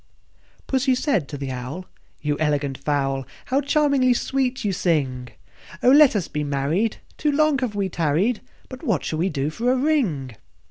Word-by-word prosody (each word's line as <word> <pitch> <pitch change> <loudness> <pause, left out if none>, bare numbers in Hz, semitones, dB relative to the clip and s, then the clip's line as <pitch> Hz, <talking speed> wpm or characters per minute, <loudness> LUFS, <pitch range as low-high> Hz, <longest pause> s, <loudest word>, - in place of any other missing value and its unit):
II. - - -39 0.3
Pussy 260 -1 +1
said 250 - 0
to 145 - -6
the 135 -1 -4
Owl, 130 +9 -6 0.4
"You 150 -1 0
elegant 145 -3 0
fowl, 135 -2 -1 0.2
How 270 +2 +1
charmingly 280 -4 +3
sweet 260 -2 -1
you 200 - +1
sing! 140 -9 0 0.6
Oh! 250 - +6
let 285 -3 +7
us 190 -5 0
be 150 0 -3
married; 145 +10 0 0.2
too 300 - +2
long 305 -1 +3 0.2
we 200 -1 0
have 190 - -5
tarried: 170 +9 +1 0.3
But 255 -1 -10
what 185 -10 -1
shall 155 - -2
we 180 +3 +1
do 145 -1 -2
for 240 +9 0
a 260 - +2
ring?" 210 - 0
185 Hz, 180 wpm, -23 LUFS, -, 0.6 s, let